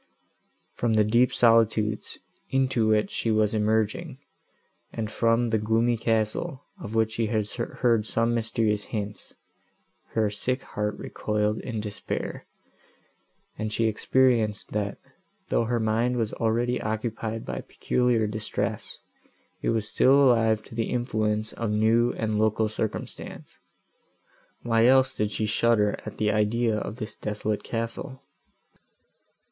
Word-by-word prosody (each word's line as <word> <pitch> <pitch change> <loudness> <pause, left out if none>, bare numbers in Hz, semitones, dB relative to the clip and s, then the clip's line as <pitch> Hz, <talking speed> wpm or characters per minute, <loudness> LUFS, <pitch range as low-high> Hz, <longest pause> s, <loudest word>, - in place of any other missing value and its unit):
From 120 -2 0
the 110 -1 +4
deep 120 +4 +3
solitudes, 110 -2 +2 0.3
into 130 -4 +1
which 110 -1 +2
she 115 - -2
was 110 -1 +2
emerging, 110 0 0 0.7
and 110 -1 -4
from 115 0 +2
the 110 - +2
gloomy 115 +3 +2
castle, 115 +7 -1 0.2
of 105 +2 -6
which 110 -1 +2
she 115 0 -1
had 110 -1 0
heard 115 -2 0
some 115 +1 +1
mysterious 110 -2 0
hints, 105 -2 -6 0.8
her 110 -2 +1
sick 130 +5 -1
heart 105 0 -3
recoiled 105 0 -1
in 115 -4 -4
despair, 105 -1 -5 1.1
and 110 0 -2
she 115 +2 0
experienced, 110 -1 +2
that, 100 -1 -2 0.5
though 115 - +2
her 120 +1 0
mind 115 +3 +1
was 110 -2 -1
already 120 +2 0
occupied 110 +1 -3
by - - -4
peculiar 125 -3 0
distress, 110 0 -3 0.6
it - - 0
was 110 -2 0
still 130 +5 +4
alive 115 -6 +4
to - - -14
the 115 0 -2
influence 110 -3 -1
of 115 -2 -3
new 110 +3 +3
and 110 -1 -1
local 110 0 +2
circumstance; 110 0 -6 1.0
why 115 0 +3
else 130 0 +5
did 105 -1 -1
she 110 +1 -2
shudder 105 -1 +2
at - - -7
the 105 -1 +1
idea 110 +2 +1
of 105 0 -4
this 110 -3 -7
desolate 105 0 -3
castle? 115 +3 -5
110 Hz, 130 wpm, -26 LUFS, 105-115 Hz, 1.1 s, else